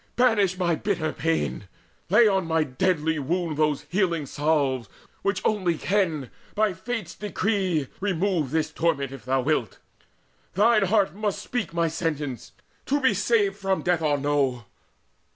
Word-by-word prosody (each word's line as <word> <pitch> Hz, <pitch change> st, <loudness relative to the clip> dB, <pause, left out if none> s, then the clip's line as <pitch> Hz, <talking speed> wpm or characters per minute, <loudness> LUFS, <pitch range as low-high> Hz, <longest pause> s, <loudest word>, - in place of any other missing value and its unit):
Banish 210 Hz, -7 st, +3 dB
my 175 Hz, -2 st, +1 dB
bitter 170 Hz, -2 st, -1 dB
pain: 165 Hz, 0 st, -1 dB, 0.4 s
Lay 235 Hz, -, +6 dB
on 190 Hz, -4 st, +1 dB
my 160 Hz, -1 st, +2 dB
deadly 155 Hz, +3 st, 0 dB
wound 165 Hz, +3 st, -1 dB
those 150 Hz, -1 st, 0 dB
healing 170 Hz, -3 st, 0 dB
salves 140 Hz, -5 st, 0 dB, 0.3 s
Which 200 Hz, -1 st, -1 dB
only 185 Hz, -6 st, +1 dB
can, 165 Hz, -, 0 dB, 0.2 s
by 215 Hz, -2 st, +2 dB
Fate's 190 Hz, -1 st, -5 dB
decree, 195 Hz, -7 st, -1 dB
remove 185 Hz, -6 st, 0 dB
This 160 Hz, +2 st, -1 dB
torment, 155 Hz, -5 st, 0 dB
if 135 Hz, -3 st, -10 dB
thou 130 Hz, +1 st, +1 dB
wilt. 125 Hz, -7 st, -1 dB, 0.8 s
Thine 215 Hz, +1 st, +4 dB
heart 200 Hz, 0 st, +2 dB
must 205 Hz, 0 st, -2 dB
speak 245 Hz, -7 st, -3 dB
My 170 Hz, 0 st, +1 dB
sentence, 150 Hz, -6 st, -3 dB, 0.4 s
to 285 Hz, +2 st, +2 dB
be 260 Hz, -5 st, +3 dB
saved 200 Hz, -1 st, +1 dB
from 195 Hz, -1 st, -1 dB
death 175 Hz, -2 st, +1 dB
or 150 Hz, -2 st, +2 dB
no. 135 Hz, -4 st, 0 dB
170 Hz, 145 wpm, -25 LUFS, 150-200 Hz, 0.8 s, Lay